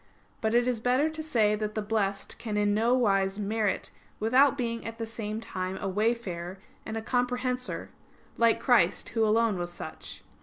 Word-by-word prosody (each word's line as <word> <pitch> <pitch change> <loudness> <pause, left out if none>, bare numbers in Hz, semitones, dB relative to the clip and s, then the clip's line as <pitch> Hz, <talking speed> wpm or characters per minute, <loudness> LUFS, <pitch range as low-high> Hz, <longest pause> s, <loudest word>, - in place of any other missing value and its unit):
But 220 +1 +1
it 240 0 +4
is 245 -3 0
better 255 +7 +2
to 315 0 -5
say 225 -9 +2
that 215 0 -3
the 215 - 0
Blessed 200 -2 -2
can 215 -3 -3
in 205 0 +2
no 230 +4 +3
wise 195 -5 +2
merit 210 -1 -1 0.3
without 260 +6 +4
being 230 -2 -2
at 225 0 -6
the 230 - -3
same 220 -1 -4
time 185 -4 -4
a 195 - -3
wayfarer 195 -4 -1 0.3
and 220 0 -3
a 220 - -4
comprehensor; 250 +1 -1 0.4
like 230 -1 +4
Christ, 210 -8 +3
Who 225 - +1
alone 220 -2 +3
was 175 0 -3
such. - - -8
220 Hz, 180 wpm, -28 LUFS, 205-240 Hz, 0.4 s, it